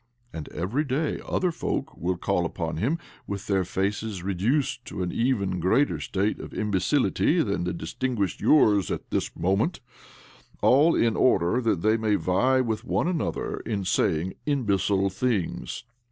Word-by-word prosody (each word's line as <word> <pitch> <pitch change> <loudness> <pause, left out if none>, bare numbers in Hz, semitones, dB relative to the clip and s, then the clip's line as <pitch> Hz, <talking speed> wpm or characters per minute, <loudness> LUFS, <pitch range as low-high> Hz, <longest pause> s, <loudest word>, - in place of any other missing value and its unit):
' 120 0 -38
And 80 -2 -6
every 105 - -1
day 145 +2 -1
other 180 -1 0
folk - - -3
will 90 +2 -2
call 90 - 0
upon 85 -1 -3
him 130 - 0 0.3
with 100 0 -5
their 95 -3 +1
faces 100 +1 -2
reduced 120 - 0
to 95 - -4
an 90 - -2
even 100 -7 0
greater 110 - +2
state 100 +2 -1
of - - -9
imbecility 115 - +1
than 100 -4 -1
distinguishes 100 +2 -2
yours 105 -10 +4
at - - -5
this - - -1
moment 100 - 0 0.4
— - - -26
all 150 +6 +5
in 115 -2 +2
order 100 0 +3
that 110 -8 0
they 110 +1 +4
may 110 -2 +1
vie 130 +10 +2
with 110 -4 -2
one - - 0
another 160 - -2
in 105 -4 -3
saying 90 -1 +1
imbecile 100 -7 +1
things. 105 -3 -2
105 Hz, 155 wpm, -26 LUFS, 95-130 Hz, 0.4 s, all